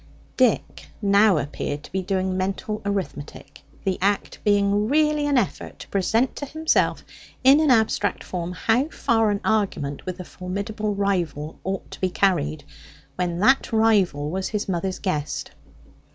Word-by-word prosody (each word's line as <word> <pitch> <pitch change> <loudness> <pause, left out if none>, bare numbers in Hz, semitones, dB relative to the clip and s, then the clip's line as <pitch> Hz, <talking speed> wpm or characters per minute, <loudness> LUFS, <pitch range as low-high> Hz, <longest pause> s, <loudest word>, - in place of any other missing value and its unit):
Dick - - +1
now 200 -2 +4
appeared 145 0 -3
to - - -12
be 190 - -1
doing 185 0 -1
mental 195 +3 -2
arithmetic, 195 -7 -5 0.2
the 190 -1 -1
act 200 +1 0
being 205 0 +2
really 300 0 +2
an 285 -2 +2
effort 225 -6 -2
to - - -10
present 220 +6 +1
to 285 - -5
himself, 315 +3 +1 0.4
in 270 +3 +7
an 310 -2 +3
abstract 220 -5 +2
form, 175 -1 -4
how 230 +9 +1
far 225 -8 +1
an 205 0 -1
argument 195 -10 0
with 185 0 -4
a - - -5
formidable 200 +4 -4
rival 175 -7 -2
ought 190 0 -4
to - - -10
be 185 - +2
carried, 155 -6 +1 0.5
when 175 -1 -1
that 260 +9 +3
rival 200 -10 +2
was 190 +1 -2
his 210 -2 -3
mother's 185 0 -2
guest. 150 -6 -3
200 Hz, 150 wpm, -23 LUFS, 180-220 Hz, 0.5 s, in